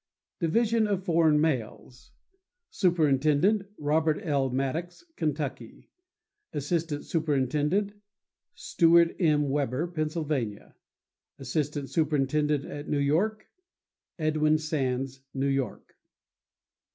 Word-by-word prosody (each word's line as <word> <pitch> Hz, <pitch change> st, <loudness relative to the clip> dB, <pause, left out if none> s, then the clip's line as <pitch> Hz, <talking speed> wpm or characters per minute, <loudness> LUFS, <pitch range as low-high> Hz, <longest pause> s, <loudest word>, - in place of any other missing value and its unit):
Division 220 Hz, +6 st, +2 dB
of 195 Hz, -2 st, -1 dB
Foreign 160 Hz, -4 st, +3 dB
Mails.— 125 Hz, -4 st, -3 dB, 0.6 s
Superintendent.—Robert 155 Hz, 0 st, +2 dB
L. 140 Hz, -5 st, 0 dB
Maddox, 145 Hz, -, -3 dB
Kentucky. 145 Hz, -7 st, -4 dB, 0.6 s
Assistant 150 Hz, 0 st, -2 dB
Superintendent.—Stewart 170 Hz, +3 st, 0 dB
M. 150 Hz, -5 st, +2 dB
Weber, 140 Hz, +1 st, 0 dB
Pennsylvania. 155 Hz, -9 st, -3 dB, 0.6 s
Assistant 145 Hz, -2 st, -3 dB
Superintendent 150 Hz, -1 st, +1 dB
at 145 Hz, -1 st, -7 dB
New 150 Hz, -, +1 dB
York.—Edwin 155 Hz, -, -1 dB
Sands, 135 Hz, -4 st, -2 dB
New 135 Hz, +1 st, 0 dB
York. 135 Hz, -5 st, -2 dB
155 Hz, 75 wpm, -27 LUFS, 140-170 Hz, 0.6 s, Foreign